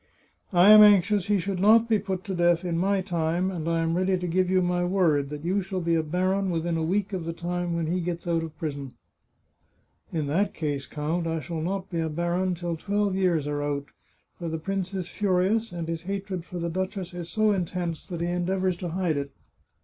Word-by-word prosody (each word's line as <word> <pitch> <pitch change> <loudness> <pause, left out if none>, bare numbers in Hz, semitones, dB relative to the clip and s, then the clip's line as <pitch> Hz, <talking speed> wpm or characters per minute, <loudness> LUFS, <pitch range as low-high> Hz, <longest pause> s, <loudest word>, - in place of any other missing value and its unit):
— - - -46
I 180 +2 +7
am 215 0 +10
anxious 205 -1 +5
he 205 0 +3
should 190 0 -2
not 220 +4 +5
be 220 -2 +3
put 190 -1 -4
to 195 - -4
death 175 0 +2
in 170 -2 -1
my 195 +3 +1
time, 175 0 -1
and 165 -3 -3
I 165 0 +1
am 165 0 0
ready 185 +1 +2
to 180 - -4
give 180 +2 +1
you 185 0 +3
my 175 0 +1
word 170 -7 +2
that 150 +1 -7
you 190 +3 +1
shall 190 0 -4
be 170 -1 0
a 165 - +3
baron 185 +5 0
within 170 0 -1
a 165 - -1
week 195 +5 0
of 185 -3 -2
the 165 0 -4
time 175 0 -3
when 170 -1 -1
he 175 +3 -1
gets 175 0 -4
out 165 -1 +1
of 160 -1 -7
prison." 140 -5 -5 0.6
" - - -41
In 155 -3 -1
that 190 +8 0
case, 145 -3 -3
count, 160 +3 -2
I 165 0 -1
shall 160 +2 -5
not 190 +3 -3
be 170 - -1
a 160 -1 -1
baron 175 +3 0
till 170 0 -3
twelve 205 +2 0
years 175 -6 +1
are 145 0 -2
out, 145 -1 -3 0.5
for 170 -2 -3
the 160 - -2
prince 190 +3 -3
is 185 -2 -3
furious, 205 +4 +1
and 170 -2 -5
his 165 -1 -3
hatred 190 -1 -4
for 180 - -7
the 170 0 -2
duchess 185 0 -3
is 175 -1 -6
so 215 -1 +2
intense 175 -3 -2
that 175 -3 -5
he 170 - 0
endeavours 180 +1 0
to 175 0 -4
hide 170 -3 0
it." 140 0 -3
175 Hz, 235 wpm, -26 LUFS, 165-190 Hz, 0.6 s, am